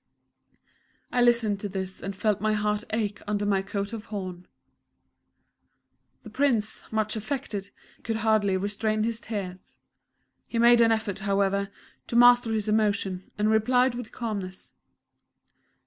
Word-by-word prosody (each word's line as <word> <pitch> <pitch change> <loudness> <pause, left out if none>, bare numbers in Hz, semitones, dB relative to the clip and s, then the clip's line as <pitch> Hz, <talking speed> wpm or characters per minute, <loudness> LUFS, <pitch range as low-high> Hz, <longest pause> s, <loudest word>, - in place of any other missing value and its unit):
I 245 - +2
listened 235 -4 +3
to 205 - -4
this 190 -1 -4
and 195 0 -5
felt 205 0 0
my 215 0 +1
heart 210 0 0
ache 215 -2 -2
under 205 0 -1
my 200 -1 +2
coat 200 +2 -4
of 225 -1 -6
horn. 185 -4 -6 1.8
The 220 - -11
Prince, 235 -4 +1
much 215 0 -1
affected, 215 -4 -4 0.3
could 225 - -3
hardly 215 -3 +2
restrain 215 +2 -1
his 230 0 -1
tears. 190 -4 -7 0.7
He 235 - -4
made 235 0 +6
an 225 -1 +5
effort, 220 -3 -1
however, 200 0 0 0.4
to - - -4
master 245 -1 +6
his 215 -1 -1
emotion, 205 -3 0
and 210 +1 +2
replied 250 +3 +3
with 240 -2 -7
calmness. 200 -6 -5
215 Hz, 135 wpm, -26 LUFS, 200-225 Hz, 1.8 s, made